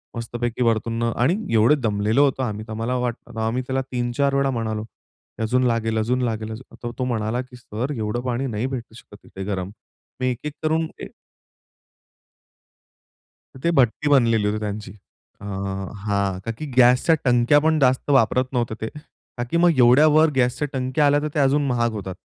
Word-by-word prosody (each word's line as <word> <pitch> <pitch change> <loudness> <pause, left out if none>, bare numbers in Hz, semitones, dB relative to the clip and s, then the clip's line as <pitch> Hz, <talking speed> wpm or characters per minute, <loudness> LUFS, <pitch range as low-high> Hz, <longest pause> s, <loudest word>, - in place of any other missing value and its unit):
मस्तपैकी 120 +1 -3
वरतून 115 0 0
न 115 - +1
आणि 130 +9 +2 0.2
एवढं 115 +7 +4
दमलेलो 110 +3 +2
होतो 135 -1 -1
आम्ही. 110 -3 -3
तर - - -8
आम्हाला 115 +3 -2
वाटलं, 120 -2 -4
आम्ही 115 +3 0
त्याला 130 0 0
3 120 -1 -1
4 140 -1 +2
वेळा 140 0 +2
म्हणालो 110 -3 -2
की 110 - -16
अजून 125 +3 +1
लागेल, 115 -1 0
अजून 120 +4 0
लागेल, 110 -2 -2
अजून 115 +4 -10
तर 120 - -3
तो - - 0
म्हणाला 115 0 -1
की 130 0 -13
"सर, 125 +2 -5
एवढं 110 +2 -2
पाणी 125 +2 -1
नाही 110 -1 -2
भेटू 120 -4 -6
शकत 105 -3 -15
इथे 95 - -8
गरम." 95 -2 -3 0.5
मी 130 - 0
एक-एक 145 +5 -5
करून 160 +1 +1 0.2
ए - - -5 2.5
तर - - -11
ते 170 - +2
भट्टी 135 +3 +2
बनलेली 115 -6 +3
होती 105 +1 -1
त्यांची 105 -2 -5 0.5
अ, - - -8
हां. 100 0 -3
ता 115 - -1
की 155 - -5
गॅसच्या 125 +6 +5
टंक्या 125 +2 +4
पण 160 +1 +2
जास्त 130 0 +2
वापरत 130 -1 +3
नव्हते 120 -3 -1
ते. 110 - -2 0.5
ता 120 - -1
की 170 - +2
मग 170 -3 +4
एवढ्या 125 +4 +6
वर 160 +1 +6
गॅसच्या 130 +3 +1
टंक्या 130 +3 +1
आल्या 145 0 +4
तर 150 - -2
ते - - 0
अजून 140 +1 +3
महाग 120 -2 +1
होतात. 95 -2 -6
120 Hz, 185 wpm, -22 LUFS, 110-130 Hz, 2.5 s, एवढ्या